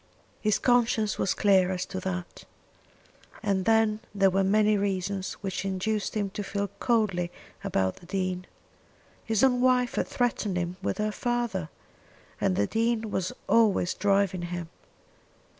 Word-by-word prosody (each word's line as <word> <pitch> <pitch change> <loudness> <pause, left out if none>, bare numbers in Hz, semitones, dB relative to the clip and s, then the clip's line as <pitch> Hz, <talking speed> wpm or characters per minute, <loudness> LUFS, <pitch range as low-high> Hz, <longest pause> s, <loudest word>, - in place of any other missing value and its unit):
His 215 -1 +2
conscience 230 -4 +2
was 190 - +1
clear 190 -3 +4
as 180 -1 -2
to 190 - -5
that. 180 -1 -5 1.0
And 195 -3 0
then 220 -1 +3 0.2
there 195 -1 +4
were 195 +1 +2
many 210 +2 +3
reasons 195 -1 -1
which 190 -1 -2
induced 195 +3 -2
him 200 -2 -1
to 205 - -4
feel 200 0 -2
coldly 205 -7 +1 0.3
about 95 -1 0
the 175 - -15
Dean. 185 -1 -2 0.8
His 225 0 +1
own 250 -2 +4
wife 250 -1 +3
had - - -1
threatened 225 -6 -1
him 175 +1 -2
with - - -2
her 215 0 0
father. 235 -8 -2 0.7
And 95 - +2
the 100 - +2
Dean 225 - 0
was 185 -1 -1 0.2
always 215 -6 +3
driving 195 -2 +1
him. 175 -1 -5
200 Hz, 145 wpm, -27 LUFS, 185-220 Hz, 1.0 s, clear